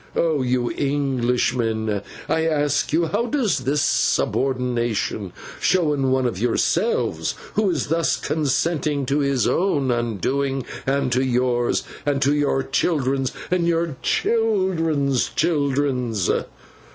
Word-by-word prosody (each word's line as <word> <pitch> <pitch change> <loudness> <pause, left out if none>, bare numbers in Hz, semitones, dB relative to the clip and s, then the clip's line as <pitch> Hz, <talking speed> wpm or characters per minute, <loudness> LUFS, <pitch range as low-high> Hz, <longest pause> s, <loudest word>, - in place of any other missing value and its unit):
Oh, 160 -4 +1
you 125 -1 0
Englishmen, 120 -6 0 0.3
I 160 0 +1
ask 150 -2 +1
you 165 +2 +2
how 225 +7 0
does 240 - +1
this 140 +3 0
subornation 120 -6 0 0.3
show 175 -5 +2
in 135 -2 0
one 130 0 +2
of 115 -7 -2
yourselves, 170 - 0 0.2
who 210 -1 +2
is 160 -7 -1
thus 165 +1 +2
consenting 150 0 0
to 140 +3 0
his 140 -3 +1
own 145 -9 +1
undoing 130 +4 -1 0.2
and 135 -1 +1
to 125 +2 +2
yours, 125 -1 +1 0.2
and 145 -1 0
to 140 +2 +3
your 145 -2 +1
children's 135 -3 0 0.2
and 175 -2 +2
your 165 -3 0
children's 170 - +1
children's? 140 - 0
140 Hz, 120 wpm, -22 LUFS, 125-160 Hz, 0.3 s, to